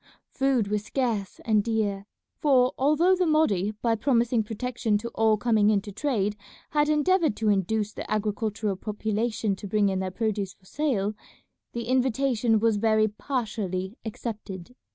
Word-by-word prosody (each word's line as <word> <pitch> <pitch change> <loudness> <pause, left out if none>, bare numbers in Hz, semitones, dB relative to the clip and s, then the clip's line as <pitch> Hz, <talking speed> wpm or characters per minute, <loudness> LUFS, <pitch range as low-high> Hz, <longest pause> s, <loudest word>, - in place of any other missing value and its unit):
Food 265 -6 +1
was 210 0 -1
scarce 220 -5 -2
and 215 -2 +3
dear, 210 -3 -1 0.3
for 255 -4 +4
although 305 +7 +3
the 365 -1 +1
Mahdi 215 - +2
by 230 -1 +3
promising 235 0 +2
protection 225 0 -1
to 235 +3 -5
all 220 -2 +2
coming 215 -2 +3
in 210 -2 +3
to 205 - -9
trade 210 -4 -1 0.4
had 295 0 +2
endeavoured 310 - +2
to 220 -1 0
induce 210 +2 0
the - - -7
agricultural 215 -1 -1
population 215 0 -1
to 200 - -7
bring 205 0 +2
in 190 -1 -1
their 190 0 -2
produce 200 -1 -2
for 190 - -29
sale, 215 -6 -1 0.6
the 235 - -3
invitation 250 -2 +1
was 225 -1 +2
very 215 0 +3
partially 210 -5 -3
accepted. 210 -3 -6
220 Hz, 155 wpm, -26 LUFS, 205-250 Hz, 0.6 s, for